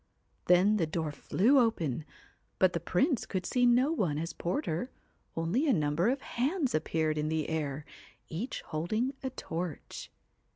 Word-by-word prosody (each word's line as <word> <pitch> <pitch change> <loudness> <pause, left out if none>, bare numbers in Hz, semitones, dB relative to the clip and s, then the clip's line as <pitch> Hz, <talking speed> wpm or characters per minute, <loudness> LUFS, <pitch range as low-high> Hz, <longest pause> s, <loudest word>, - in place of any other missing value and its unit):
Then 190 +4 +5
the 165 -5 +1
door 160 -1 -2
flew 225 - +3
open, 165 - 0 0.5
but 185 -1 +4
the 170 - 0
Prince 215 - +1
could 185 -2 -3
see 245 -1 +3
no 250 +5 +4
one 180 - 0
as 165 +2 -3
porter, 180 - -2 0.5
only 175 - +1
a 275 - +5
number 155 +3 +2
of 270 +2 0
hands 275 +4 -1
appeared 155 0 0
in 150 +1 -1
the 160 -1 -1
air, 150 -2 -2 0.4
each 195 +11 -4
holding 215 - -1
a 265 - -2
torch. 170 - -6
180 Hz, 155 wpm, -31 LUFS, 155-245 Hz, 0.5 s, Then